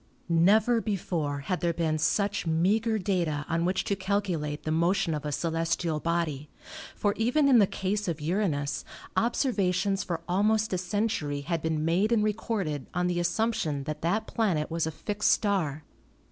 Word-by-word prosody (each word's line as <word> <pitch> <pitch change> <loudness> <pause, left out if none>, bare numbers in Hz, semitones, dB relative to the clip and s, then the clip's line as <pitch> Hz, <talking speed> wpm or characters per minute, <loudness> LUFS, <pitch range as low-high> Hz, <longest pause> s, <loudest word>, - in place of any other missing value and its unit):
Never 210 +8 +4
before 165 -9 -2
had 180 +5 -2
there 170 -2 0
been 160 -2 0
such 200 +4 0
meager 210 +8 +2
data 175 -7 -1
on 170 0 0
which 185 +1 0
to 200 - -1
calculate 185 -6 -2
the 155 - -2
motion 170 +2 +2
of 150 -1 -4
a - - -2
celestial 165 0 -1
body, 155 -4 -2 0.5
for 205 -1 +1
even 250 +6 +3
in 255 -4 +6
the 200 - +5
case 205 +2 -2
of 165 -3 -2
Uranus 150 -4 -1 0.3
observations 200 -6 +1
for 170 -2 -3
almost 210 +3 +2
a 185 - 0
century 180 -7 -1
had 165 +2 -2
been 160 -1 -1
made 185 +7 +2
and 225 -3 +3
recorded 200 - -2
on 180 0 +1
the 175 -1 0
assumption 175 -5 0
that 155 +1 -5
that 190 +7 0
planet 175 -10 0
was 165 -1 0
a - - -2
fixed 205 +6 -1
star. 165 -8 0
175 Hz, 165 wpm, -28 LUFS, 160-205 Hz, 0.5 s, in